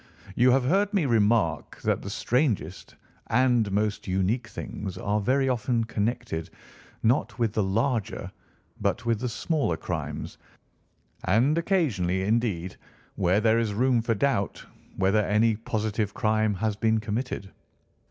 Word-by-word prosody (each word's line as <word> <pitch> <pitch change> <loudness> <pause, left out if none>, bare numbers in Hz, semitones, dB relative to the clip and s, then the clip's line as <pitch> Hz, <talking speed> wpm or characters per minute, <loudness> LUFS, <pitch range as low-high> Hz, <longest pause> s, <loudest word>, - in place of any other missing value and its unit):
You 125 +1 +5
have 130 +1 +4
heard 195 +8 +2
me 185 -6 +2
remark 105 - +1
that - - +1
the 100 - -6
strangest 110 - -1 0.3
and 120 -3 +2
most 105 +1 -1
unique 95 +6 0
things 100 -3 -6
are 105 +1 0
very 135 +5 +2
often 120 -2 0
connected 115 -5 -2 0.5
not 120 +4 +1
with 115 -4 0
the 110 - +1
larger 110 +3 -1 0.5
but - - -1
with 115 -2 +1
the 125 - -2
smaller 135 - -1
crimes, - - -5 0.9
and 120 - +3
occasionally, 125 - +1
indeed, 100 -5 -1 0.4
where 90 +4 +2
there 110 +1 +3
is 110 -3 -1
room 125 +1 +3
for 115 0 0
doubt 100 -4 -1 0.3
whether 100 +3 +3
any 110 +2 +2
positive 110 -1 -2
crime 110 -1 +1
has 105 +2 -1
been 110 +1 +2
committed. 110 -2 -4
110 Hz, 135 wpm, -26 LUFS, 100-125 Hz, 0.9 s, You